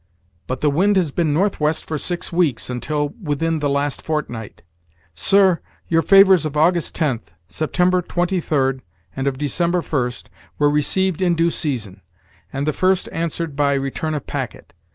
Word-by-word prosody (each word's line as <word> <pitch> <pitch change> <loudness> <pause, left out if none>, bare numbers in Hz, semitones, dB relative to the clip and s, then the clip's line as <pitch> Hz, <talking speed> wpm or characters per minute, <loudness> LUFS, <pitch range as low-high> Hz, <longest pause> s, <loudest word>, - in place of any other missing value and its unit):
but 130 0 -3
the 150 - +3
wind 195 +8 +3
has 175 -6 +2
been 160 0 0
northwest 160 -2 0
for 160 - -4
six 175 +3 -3
weeks, 160 -9 +1
until 145 +4 -2
within 160 0 -1
the 145 -1 0
last 140 0 -1
fortnight. 120 -9 -4 0.5
Sir, 190 - +3 0.3
your 165 -1 +3
favors 195 -2 +6
of 150 -1 -3
August 170 +2 +2
10th, 120 - -2
September 180 +3 +1
23d, 160 -8 0 0.3
and 135 +1 -2
of 135 -1 -1
December 170 +5 0
1st, 125 -6 -2 0.3
were 145 0 +3
received 180 +5 0
in 175 -2 +2
due 170 +1 +2
season, 110 - -3 0.5
and 135 +1 -2
the 155 - 0
first 185 +2 +1
answered 165 -2 -3
by 140 -1 +2
return 140 +3 -2
of 145 - -4
packet. - - -6
155 Hz, 155 wpm, -20 LUFS, 140-175 Hz, 0.5 s, favors